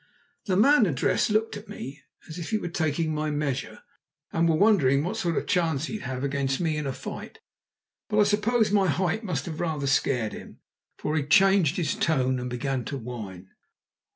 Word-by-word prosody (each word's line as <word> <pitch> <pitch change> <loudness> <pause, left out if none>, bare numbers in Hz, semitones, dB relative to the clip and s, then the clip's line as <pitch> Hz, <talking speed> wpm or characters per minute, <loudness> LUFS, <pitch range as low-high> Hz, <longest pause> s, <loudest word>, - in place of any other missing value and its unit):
The 185 -3 +1
man 245 +1 +5
addressed 145 - +1
looked 215 +1 +1
at 205 +1 -12
me 145 -8 -8 0.3
as 165 +1 -8
if 165 - -5
he 220 - +1
were 175 - -4
taking 160 -1 -1
my 155 0 -1
measure, 145 -3 -3 0.5
and 165 0 +2
were 160 - +3
wondering 155 -9 +4
what 185 +6 -2
sort 175 -7 -1
of - - -1
chance 165 -6 +1
he'd 215 +5 -5
have 130 0 -4
against 140 -1 -1
me 160 -3 0
in 150 -2 -3
a - - -1
fight. - - -8 0.7
But 210 - 0
I - - +7
suppose 210 +2 +2
my 200 -2 +3
height 185 +7 0
must 160 - -2
have 160 -2 -6
rather 155 -5 -2
scared 125 -5 +1
him, - - -10 0.4
for 150 - -2
he 155 - +2
changed 185 +2 +4
his 170 -4 0
tone 130 -5 +1
and 125 0 -4
began 125 +1 -2
to 140 - -4
whine. 105 -7 -8
155 Hz, 195 wpm, -26 LUFS, 135-195 Hz, 0.7 s, I